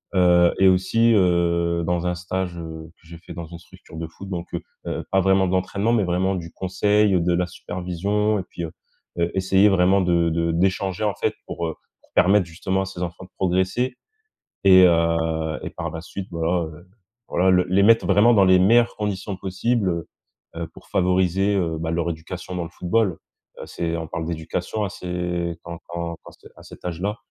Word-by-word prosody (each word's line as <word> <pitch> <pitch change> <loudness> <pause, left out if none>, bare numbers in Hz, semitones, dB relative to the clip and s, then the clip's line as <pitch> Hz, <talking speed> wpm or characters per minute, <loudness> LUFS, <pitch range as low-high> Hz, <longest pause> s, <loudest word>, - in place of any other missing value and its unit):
heu, 90 -1 +5
et 95 - +6
aussi, 115 +6 +3
heu, 85 -3 +2
dans 90 0 0
un 90 - 0
stage, 90 0 -4
heu, 80 -1 -8
que 80 - -22
j'ai 85 0 -10
fait 85 - -11
dans 85 0 -6
une 85 +1 -10
structure 85 -1 -15
de 80 0 -4
foot, 95 +4 -11
donc 90 -2 -4
heu - - -2 0.3
heu, - - -3
pas 95 - +4
vraiment 95 0 +3
d'entraînement 95 +4 0
mais 110 -4 +3
vraiment 90 +2 0
du 85 -2 -6
conseil, 95 0 +2
de 85 +1 +1
la 90 +1 +1
supervision 90 +4 -2
et - - -4
puis, 85 - -6
heu 80 - -5 0.5
heu, 85 0 +2
essayer 95 +2 +4
vraiment 95 0 +4
de 85 -2 +2
de 85 0 0
d'échanger 95 +3 0
en 105 - +1
fait - - -1
pour, 85 -1 -4
heu 80 - -5 0.3
pour - - -30
permettre 95 +2 +4
justement 95 +3 -2
à 95 - -2
ces 95 -2 -8
enfants 85 +1 -6
de - - -19
progresser 95 +8 0 0.7
et 95 -1 +8
heu 80 -2 +1
et - - -5
par 85 - -5
la 80 +1 -6
suite 95 +3 -7
voilà 85 +1 0 0.6
voilà 95 +2 +2
le 90 -1 +4
les 95 +2 +4
mettre 115 +2 +5
vraiment 105 +5 +5
dans 100 -3 +5
les 95 0 +6
meilleures 115 +5 +4
conditions 100 -2 -3
possibles, 95 +3 -1
heu 85 -1 -4 0.5
heu, 85 0 -3
pour - - -16
favoriser, 95 +2 +2
heu, 85 -4 0
bah, 80 0 -3
leur 85 0 -1
éducation 85 +3 -7
dans 90 - -2
le 85 - -9
football, 90 +1 0 0.4
heu. - - -7
C'est 85 -1 -3
on 80 -1 -4
parle 80 0 -4
d'éducation 85 +6 -3
à - - -2
ce 90 -2 -3
quand 85 0 -8
quand 85 -1 -4
quand - - -13
c'est - - -17
à - - -14
cet - - -14
âge-là. 90 +5 -3
90 Hz, 200 wpm, -23 LUFS, 85-95 Hz, 0.7 s, et